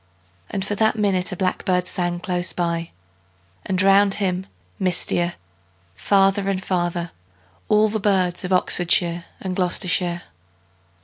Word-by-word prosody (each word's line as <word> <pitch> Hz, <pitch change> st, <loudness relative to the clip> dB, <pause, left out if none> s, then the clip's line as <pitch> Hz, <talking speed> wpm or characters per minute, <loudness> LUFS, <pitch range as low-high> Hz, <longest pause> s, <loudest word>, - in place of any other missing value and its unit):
And 195 Hz, -1 st, -3 dB
for 205 Hz, -, -3 dB
that 220 Hz, +2 st, +2 dB
minute 195 Hz, -3 st, +1 dB
a -, -, -4 dB
blackbird 185 Hz, 0 st, 0 dB
sang 175 Hz, -1 st, -2 dB
Close 180 Hz, -2 st, -1 dB
by, 170 Hz, -1 st, -2 dB, 0.8 s
and 185 Hz, -1 st, -1 dB
round 195 Hz, 0 st, +4 dB
him, 190 Hz, -2 st, -2 dB, 0.3 s
mistier, 175 Hz, -1 st, 0 dB, 0.6 s
Farther 195 Hz, -, +2 dB
and 190 Hz, -1 st, -2 dB
farther, 175 Hz, -2 st, -2 dB, 0.6 s
all 215 Hz, 0 st, +4 dB
the 215 Hz, +1 st, -2 dB
birds 190 Hz, -3 st, +1 dB
Of 180 Hz, -, -4 dB
Oxfordshire 175 Hz, -1 st, +2 dB
and 185 Hz, -1 st, -4 dB
Gloustershire. 180 Hz, -1 st, +1 dB
185 Hz, 125 wpm, -22 LUFS, 175-195 Hz, 0.8 s, round